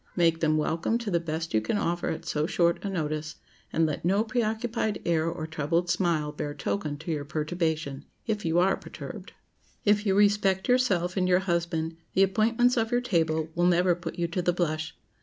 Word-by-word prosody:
Make 165 -2 +3
them 155 -1 +2
welcome 165 +8 0
to 230 -4 -4
the 170 - +2
best 160 0 -4
you 110 - +3
can 110 - -1
offer 175 -3 -1
at 160 - -4
so 150 +1 0
short 170 -1 +1
a 200 - -2
notice, 155 -3 -3 0.4
and 165 - +2
let 155 - -3
no 195 +5 +3
preoccupied 220 -1 -1
air 165 -1 +2
or 165 -2 -4
troubled 160 +3 0
smile 160 -5 +1
bear 145 0 -5
token 150 -1 -2
to 160 +3 -5
your 150 -2 -2
perturbation—if 155 - -3
you 165 +1 +1
are 185 +2 +3
perturbed. - - -9 0.5
If 210 0 +4
you 190 - +3
respect 200 -2 +3
yourself 195 -8 +2
and 185 -1 +2
your 180 +1 +4
husband, 170 -3 -1 0.2
the 195 - +6
appointments 230 +5 +2
of 225 -1 +1
your 245 0 +2
table 160 -7 0
will 175 +2 +2
never 180 0 +4
put 170 -1 -6
you 170 -1 0
to 180 +2 -1
the 175 0 +1
blush. 160 -2 -2
170 Hz, 195 wpm, -27 LUFS, 160-195 Hz, 0.5 s, the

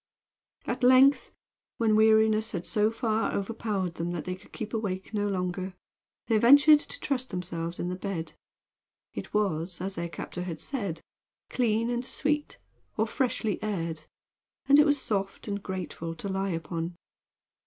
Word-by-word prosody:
At - - -3
length, 260 +3 +6 0.5
when 220 -2 +3
weariness 220 0 +4
had 175 -2 -3
so 210 +5 +2
far 225 -1 0
overpowered 200 -3 -2
them 170 +1 -3
that 165 -4 -4
they 185 - -2
could 185 +3 -13
keep 220 0 -6
awake 200 -3 -3
no 205 -1 0
longer, 185 -1 -2 0.5
they 225 -2 +2
ventured 285 +6 +8
to - - -7
trust 260 -2 -2
themselves 170 -1 -4
in 175 - -2
the 180 - -2
bed. 185 -3 -4 0.8
It - - -6
was, 180 -4 -1
as 190 +2 -3
their 170 -1 -4
captor 170 +2 -6
had 170 -3 -5
said, 200 - -4 0.5
clean 230 -1 +1
and 240 0 -1
sweet, 295 +3 -1 0.4
or 220 - +3
freshly 225 -3 -1
aired, 165 -7 -3 0.6
and 280 +2 +6
it 300 - +6
was 290 -1 +3
soft 195 -5 -3
and 200 -1 -3
grateful 170 -3 -5
to 180 - -6
lie 195 0 -1
upon. 165 0 -3
200 Hz, 155 wpm, -28 LUFS, 180-225 Hz, 0.8 s, ventured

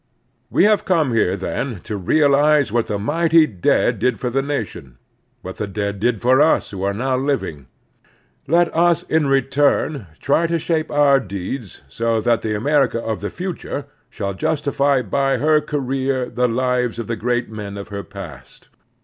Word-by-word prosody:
We - - +3
have 210 0 +4
come 160 -9 +1
here, 100 -5 +2
then, 115 -5 -4
to 105 - -5
realize 145 - +3
what 120 0 0
the 105 - -2
mighty 160 +8 +3
dead 95 - +1
did 125 -3 0
for 125 - -2
the 135 +3 +1
nation, 115 - -5 0.5
what 95 - -7
the 105 - -3
dead 100 0 -3
did 115 +1 +1
for 130 +3 +4
us 155 +1 +2
who 95 -2 -6
are 100 +1 0
now 130 +4 0
living. 130 - -2 0.8
Let 170 +3 +2
us 170 0 +3
in 160 -3 +1
retiun 135 - +1
try 160 +4 +2
to 170 0 0
shape 160 0 -1
our 145 -2 +4
deeds 100 - -6
so 115 +10 -1
that 115 +1 +1
the 110 -1 -2
America 135 +2 +1
of 110 -2 -4
the 105 - -3
future 175 -6 -5 0.2
shall 100 -3 -4
justify 140 +2 0
by 135 +6 0
her 155 0 +3
career 135 -3 -1
the 125 0 +1
lives 125 0 0
of 115 - -4
the 115 - -3
great 120 +1 -1
men 105 -2 -7
of 100 - -8
her 100 -1 -5
past. 85 -9 -11
125 Hz, 175 wpm, -20 LUFS, 105-145 Hz, 0.8 s, have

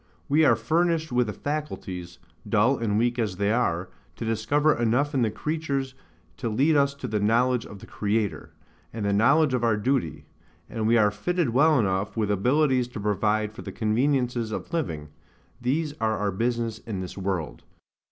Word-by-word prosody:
We 155 +3 +3
are - - +5
furnished 165 -1 0
with 125 -2 +1
faculties 95 - -4 0.3
(dull 115 +6 +3
and 105 -3 0
weak 120 +2 +1
as 105 -5 -1
they 100 +1 +1
are) 90 -7 0 0.3
to - - -5
discover 140 +8 +2
enough 120 +6 +1
in 135 - +1
the 115 - +2
creatures 140 +1 -3 0.4
to 120 - -3
lead 140 +8 +2
us 140 -1 +2
to 135 -2 -6
the 105 -2 -1
knowledge 120 +3 +2
of 100 - -10
the - - -12
Creator, 105 0 -2 0.4
and 110 -2 -4
the 100 - +1
knowledge 140 +7 +4
of 125 -2 0
our 115 -2 +2
duty; 100 - -1 0.4
and 110 -1 -2
we 120 +1 +4
are 105 -2 +4
fitted 165 - -1
well 150 +5 +4
enough 100 -1 0
with 105 -2 +1
abilities 125 +4 +2
to 120 -3 -8
provide 105 +1 0
for - - -9
the - - -7
conveniences 120 0 0
of 165 - -6
living: 80 - -3 0.5
these 145 +5 0
are 110 -1 +1
our 100 -1 -1
business 115 +2 -1
in 105 -5 -5
this 90 - -7
world. 95 -5 -3
115 Hz, 180 wpm, -26 LUFS, 105-140 Hz, 0.5 s, are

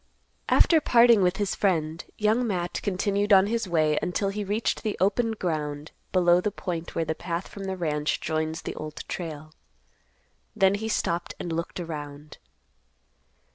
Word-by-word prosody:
After 325 -2 +5
parting 235 -5 +6
with 180 +1 +2
his 205 -2 -1
friend, 165 -4 0
Young 220 +3 +2
Matt 180 -4 -2
continued 200 +2 0
on 190 -1 +7
his 225 0 -1
way 155 -3 +2
until 195 +2 -1
he 205 +1 -3
reached 205 +3 -1
the 215 - -2
open 220 +4 +2
ground 150 -6 -3 0.2
below 175 -1 +4
the 210 - 0
point 175 -5 -5
where 165 - 0
the 160 - -1
path 170 +2 -4
from 200 -1 -8
the 190 -1 -3
ranch 150 -3 -1
joins 160 +1 -2
the - - -4
Old 155 0 -7
Trail. 155 -3 -6 1.0
Then 195 -2 +4
he 220 +2 -3
stopped 170 -5 -1
and 170 - -4
looked 170 +2 -4
around. 150 -3 -7
180 Hz, 160 wpm, -26 LUFS, 160-205 Hz, 1.0 s, on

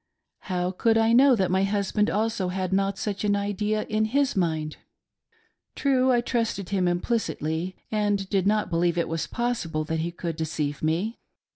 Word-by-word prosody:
How 180 -2 -1
could 225 +4 +2
I 225 +1 +3
know 260 +2 +6
that 190 -4 0
my 190 +1 +2
husband 205 +1 +1
also 215 -3 0
had 185 0 -2
not 195 0 +1
such 200 0 -3
an 205 -1 +2
idea 205 +1 -1
in 215 0 0
his 275 +5 +1
mind 160 -4 -1 0.5
.' - - -41
True, 260 -2 +2
I 240 -1 +3
trusted 230 -6 -2
him 190 -3 +1
implicitly, 175 -3 -1 0.2
and 205 -2 0
did 195 -1 +1
not 210 -1 +1
believe 170 0 +1
it 170 - +1 0.2
possible 235 -11 -1
that 160 +1 -2
he 165 +2 -1
could 170 -2 -5
deceive 150 -3 -2
me. 175 +9 -1
195 Hz, 170 wpm, -26 LUFS, 175-215 Hz, 0.5 s, know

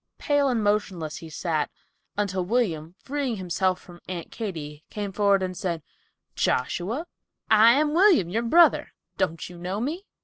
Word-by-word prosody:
Pale 285 -2 +2
and 235 -4 0
motionless 190 -7 0
he 165 - -9
sat, 155 -1 -1 0.5
until 190 -3 0
William, 175 -6 -1
freeing 275 -3 -2
himself 185 -1 0
from 175 -1 -15
Aunt 175 -2 -6
Katy, 160 -9 -6
came 205 -2 -4
forward 200 -1 +3
and 185 0 -3
said, 170 -4 -3 0.5
"Joshua, 195 - -1 0.5
I 220 +2 +8
am 300 +2 +2
William, 350 - +5
your 215 +7 -1
brother; 330 +9 +4 0.2
don't 165 +1 -1
you 175 -1 -11
know 185 +4 -3
me?" 320 - -3
195 Hz, 150 wpm, -26 LUFS, 175-240 Hz, 0.5 s, I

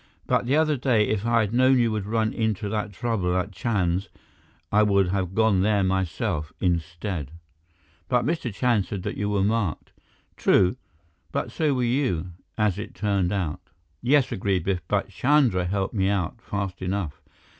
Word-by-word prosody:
"But - - +1
the 135 - +3
other 155 -1 +2
day, 120 -4 +2
if 110 +1 -1
I 115 -1 +4
had 105 0 -2
known 130 +2 +5
you 120 -2 +2
would 105 -2 -3
run 110 0 0
into 110 -2 -1
that 105 -1 -2
trouble 95 -4 -1
at 95 +3 -2
Chand's, 95 -1 -1 0.6
I 105 - +4
would 100 -3 +3
have 95 -1 -2
gone 110 -4 +3
there 100 0 +2
myself, 95 -3 -1
instead." 85 -2 -2 0.8
"But 125 -1 +2
Mr. 160 -6 -1
Chand 110 -1 +1
said 100 -3 -5
that - - -3
you 105 0 -2
were 100 -2 +1
marked." 105 -6 -1 0.5
"True. 95 +2 +3 0.6
But - - -2
so 150 -4 +1
were 125 - 0
you, 120 - 0 0.3
as 105 -3 +1
it 105 0 -7
turned 100 -4 0
out." 90 -7 -2 0.4
"Yes," 135 0 +3
agreed 95 -2 0
Biff, 95 -1 -1
"but - - 0
Chandra 125 -10 +2
helped 95 +1 -1
me 95 -3 +1
out 100 +3 -2
fast 100 -4 -4
enough. 90 -5 -3
100 Hz, 170 wpm, -25 LUFS, 95-115 Hz, 0.8 s, known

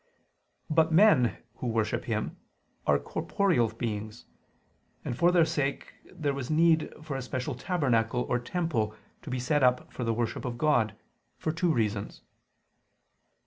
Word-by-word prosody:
But 160 +1 +3
men, 160 - +5 0.2
who 125 - -4
worship 110 -2 0
Him, - - -2 0.5
are - - +5
corporeal 175 - +1
beings: 110 0 -5 0.8
and 120 - -2
for 170 +7 +4
their 175 -2 +5
sake 140 -3 -2 0.2
there 150 -6 -2
was 135 -2 -5
need 160 0 +3
for 150 -3 -4
a 135 - -3
special 125 0 -3
tabernacle 125 -5 0
or 125 - 0
temple 120 -7 -1 0.3
to - - -9
be 130 0 -2
set 145 +4 +1
up 125 -1 +2
for 125 - -4
the 115 - +1
worship 115 -1 -2
of 120 -2 -4
God, 115 -7 +2 0.4
for 155 - -1
two 170 +1 +1
reasons. 105 -6 -1
130 Hz, 145 wpm, -29 LUFS, 115-160 Hz, 0.8 s, men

